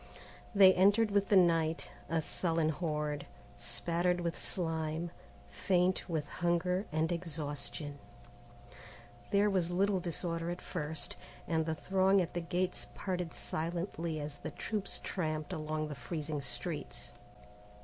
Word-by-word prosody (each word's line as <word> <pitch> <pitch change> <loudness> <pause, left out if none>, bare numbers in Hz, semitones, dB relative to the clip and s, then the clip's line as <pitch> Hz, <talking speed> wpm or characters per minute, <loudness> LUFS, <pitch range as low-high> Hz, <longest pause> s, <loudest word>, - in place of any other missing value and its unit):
They 190 -1 +9
entered 205 +4 +5
with 200 -1 +2
the 205 - +5
night, 165 -3 +3 0.2
a 165 -1 +1
sullen 165 -2 +1
horde, 150 -3 -2 0.3
spattered 175 +1 0
with 170 -1 -1
slime, 160 -1 -2 0.4
faint 185 0 +1
with 155 -3 -1
hunger 180 +3 +1
and 160 +2 +1
exhaustion. 150 -3 -3 1.3
There 200 +1 +4
was 185 -4 +2
little 190 +2 +2
disorder 170 -1 -2
at 175 +1 -3
first, 160 -2 -3 0.3
and 160 -1 +1
the 160 - 0
throng 190 +5 +3
at 175 -2 -1
the 175 - -1
gates 180 +2 -1
parted 180 -3 -2
silently 165 -1 -2
as 145 0 -5
the - - -5
troops 210 -3 -2
tramped 155 -1 -2
along 155 -1 -2
the 150 - -5
freezing 150 -1 -3
streets. 130 0 -3
170 Hz, 130 wpm, -33 LUFS, 155-180 Hz, 1.3 s, They